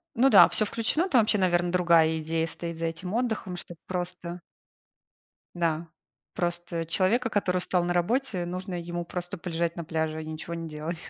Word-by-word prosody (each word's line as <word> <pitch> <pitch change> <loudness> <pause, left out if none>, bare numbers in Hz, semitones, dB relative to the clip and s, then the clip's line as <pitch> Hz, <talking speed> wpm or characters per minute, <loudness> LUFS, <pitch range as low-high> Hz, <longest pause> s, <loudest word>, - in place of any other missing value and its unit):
Ну 255 +3 +5
да, - - +9
всё 215 - +2
включено, 240 - 0
там 255 -9 +5
вообще, 215 0 +2
наверно, 175 -2 +2
другая 170 -3 +4
идея 160 +1 -1
стоит 170 0 -6
за 165 - -2
этим 165 +3 -4
отдыхом, 220 -6 -1
чтоб 175 -1 -8
просто 180 -1 -4 1.1
да, 170 -1 -1 0.5
просто 175 -1 -2
человека, 195 +8 +2
который 190 -4 +1
устал 180 0 +1
на 175 0 0
работе, 185 +1 0
нужно 185 +1 -5
ему 175 0 -4
просто 175 +3 -5
полежать 170 -1 -2
на 170 - -4
пляже 160 -1 -2
и - - -9
ничего 160 +2 -6
не 165 -1 -5
делать. 155 +2 -6
175 Hz, 175 wpm, -27 LUFS, 165-185 Hz, 1.1 s, да